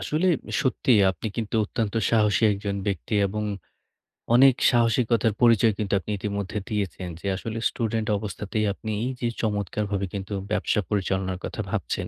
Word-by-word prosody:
আসলে 155 +5 0 0.4
সত্যি 130 -1 0 0.2
আপনি 90 +3 -6
কিন্তু 115 -1 -3
অত্যন্ত 110 0 -3 0.2
সাহসী 105 -2 +3
একজন 100 0 -3
ব্যক্তি 100 +2 -2
এবং 105 +2 -3 0.9
অনেক 130 +1 +7 0.2
সাহসিকতার 115 -2 +2
পরিচয় 115 -2 +5
কিন্তু 100 -1 -1
আপনি 105 - -6
ইতিমধ্যে 100 0 -3
দিয়েছেন। 95 -4 -3
যে - - -11
আসলে 115 +3 -5
স্টুডেন্ট 110 -2 -2
অবস্থাতেই 105 +1 -3
আপনি 110 +2 -6
এই 125 - -1
যে 120 - 0
চমৎকারভাবে 105 -1 -1
কিন্তু 100 0 -5 0.2
ব্যবসা 105 - +1
পরিচালনার 95 -2 -1
কথা - - -4
ভাবছেন। - - -2
105 Hz, 145 wpm, -25 LUFS, 100-115 Hz, 0.9 s, অনেক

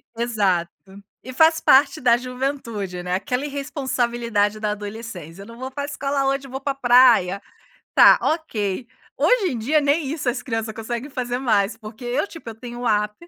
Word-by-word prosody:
Exato. 205 -7 0 0.5
E 255 - -8
faz 320 +3 +4
parte 285 +3 +4
da 240 -2 +4
juventude, 245 -7 -4
né, 180 0 -2
aquela 250 +8 -2
irresponsabilidade 240 -7 -1
da 210 - -1
adolescência, 205 -4 -7
eu 200 - -11
não 230 0 -12
vou 260 +1 -5
para 285 +2 -5
escola 280 -1 -2
hoje, 275 0 -1
eu - - -13
vou 265 +1 -5
para 275 0 -2
praia. 245 -7 +4 0.5
Está, - - +7
ok. 235 - -2 0.3
Hoje 420 -9 +2
em 240 - -3
dia 290 +8 +2
nem 290 +1 +1
isso 305 -5 -3
as 245 0 -1
criança 225 -3 -3
conseguem 235 +5 -5
fazer 245 -1 -3
mais, 220 -4 +1
porque 220 +1 -11
eu 250 +9 -1
tipo 330 -10 -11
eu - - -9
tenho 240 +1 -9
o 245 - -1
app. 210 0 +1
240 Hz, 180 wpm, -22 LUFS, 215-275 Hz, 0.5 s, Está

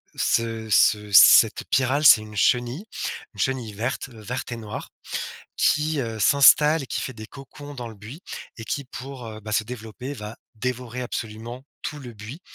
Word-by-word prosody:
ce 115 -1 -1
ce 105 0 +3
cette 100 - +7
pyrale, 135 +3 +1
c'est 110 - +9
une 105 0 -11
chenille, 125 - +1 0.5
une 105 - -15
chenille 125 -4 -1
verte, 120 +6 -3
heu, 115 -3 -14
verte 125 +4 -5
et 120 - -4
noire 110 -2 -7 0.7
qui, 155 0 +2
heu, 115 -3 -4
s'installe 150 +5 +6
et - - -12
qui - - -3
fait 130 - -4
des 110 -2 -10
cocons 145 +3 -11
dans 120 -3 -6
le 115 - -11
buis 110 - -11 0.4
et 110 - -8
qui, 140 +5 -3
pour, 130 0 -9
heu, 110 -1 -8
bah, 105 0 -7
se 110 0 +1
développer, 120 +3 -7
va 105 -4 -8 0.2
dévorer 125 +1 -4
absolument 120 +2 -6 0.2
tout 150 - -5
le 125 -4 -9
buis 110 - -9
120 Hz, 180 wpm, -24 LUFS, 110-135 Hz, 0.7 s, c'est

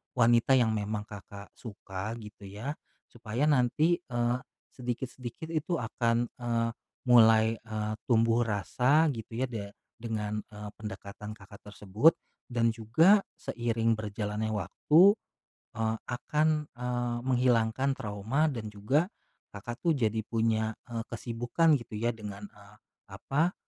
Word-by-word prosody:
wanita 120 +2 +5
yang 115 -3 +3
memang 105 0 -2
Kakak 100 -1 -11
suka 100 -1 -7
gitu 105 -3 -11
ya. 105 +9 -5 0.4
Supaya 120 +3 -3
nanti, 150 +4 +3
eee, 120 -5 -1 0.3
sedikit-sedikit 125 +3 -6
itu 165 +2 -1
akan, 120 -2 0
eee, 115 -2 -1 0.4
mulai, 110 -1 +6
eee, 110 -1 -4
tumbuh 115 0 +3
rasa 130 - +2
gitu 115 -2 -7
ya 130 - -3
de 100 -3 -6 0.2
dengan, 105 -2 -3
eee, 105 -2 -8
pendekatan 105 0 -7
Kakak 100 -1 -14
tersebut, 105 - +3 0.3
dan 115 -2 +2
juga 140 - +5 0.2
seiring 115 -1 -1
berjalannya 105 +1 -3
waktu, 155 - +5 0.7
eee, 110 0 0
akan, 150 +5 +1 0.3
eee, 120 -1 -2
menghilangkan 125 +1 +2
trauma 110 +9 -1
dan 115 -6 -5
juga 105 - +1 0.5
Kakak 120 +4 -6
tuh 165 -3 +2
jadi 110 -4 0
punya, 110 -1 0 0.2
eee, 115 0 -4
kesibukan 120 +7 +1
gitu 115 -2 -11
ya 115 +3 0
dengan, 105 -2 -8
eee, 100 0 -18 0.4
apa, 160 +7 0
115 Hz, 125 wpm, -29 LUFS, 105-125 Hz, 0.7 s, mulai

